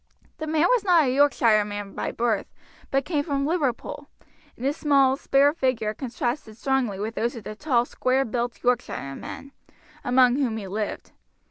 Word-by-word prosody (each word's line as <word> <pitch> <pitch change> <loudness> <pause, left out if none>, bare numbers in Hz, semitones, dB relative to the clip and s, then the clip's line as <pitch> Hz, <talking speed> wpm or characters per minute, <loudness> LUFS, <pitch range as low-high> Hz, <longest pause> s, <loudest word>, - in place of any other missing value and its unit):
The 315 - -4
man 310 0 +2
was - - +3
not 350 -5 +5
a 255 -2 +1
Yorkshireman 215 -7 +2
by - - -3
birth, 235 -1 0 0.4
but 270 0 0
came 300 -5 0
from 280 -2 -1
Liverpool, 290 -7 -2 0.5
and 245 - -6
his 280 +2 +1
small, 275 -4 +3
spare 280 +1 +3
figure 255 -8 0
contrasted 240 -2 -4
strongly 250 -5 0
with 215 +3 -3
those 235 +2 -1
of 230 - -8
the 215 - -6
tall, 245 -2 +1
square 260 +2 0
built 240 +1 -3
Yorkshiremen, 245 - -3 0.5
among 250 0 +4
whom 245 -6 0
he 210 - -6
lived. 210 +2 -4
255 Hz, 160 wpm, -25 LUFS, 225-280 Hz, 0.5 s, not